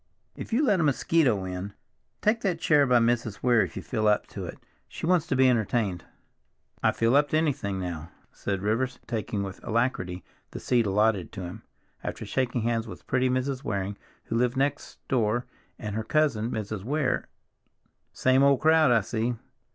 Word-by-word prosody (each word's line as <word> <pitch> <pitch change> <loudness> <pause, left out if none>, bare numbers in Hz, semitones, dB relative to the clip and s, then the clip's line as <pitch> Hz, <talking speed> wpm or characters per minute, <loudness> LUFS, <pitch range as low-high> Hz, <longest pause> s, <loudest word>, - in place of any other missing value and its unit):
"If - - -8
you 260 +7 +3
let 205 -7 +3
a - - +2
mosquito 135 - +2
in—Take 100 - -4
that 180 -6 0
chair 145 -4 +4
by 125 -1 +5
Mrs. 120 -2 0
Weir 120 -2 +5
if - - -3
you - - -5
feel 110 -4 -1
up 105 0 +3
to - - -6
it; - - -8 0.3
she - - -6
wants 175 -1 +2
to 135 - 0
be 130 0 +5
entertained." 110 -6 0 0.8
"I - - +4
feel 115 +3 +2
up 145 0 +4
to 155 - +2
anything—now," 95 - -2 0.2
said 100 -1 -3
Rivers, 115 +5 0
taking 110 -3 -3
with 95 -1 -7
alacrity 110 -6 -1 0.3
the - - -7
seat 120 -4 +1
allotted 105 -2 +1
to 95 - -6
him, 90 0 -7 0.4
after - - -5
shaking 125 -2 -1
hands 115 0 0
with - - -10
pretty 130 0 +1
Mrs. 130 +1 -1
Waring, 100 -4 -2 0.3
who 115 - -2
lived 125 +2 +1
next 140 +1 -2
door, 120 -1 +1 0.3
and 105 -3 -5
her 110 - -1
cousin, 120 -4 +1
Mrs. 110 -3 -4
Weir. 140 +2 0 0.8
"Same 130 +1 +3
old 140 -1 +5
crowd, 160 -2 +5
I 115 -2 +4
see." 115 +3 -2
120 Hz, 175 wpm, -27 LUFS, 105-140 Hz, 0.8 s, by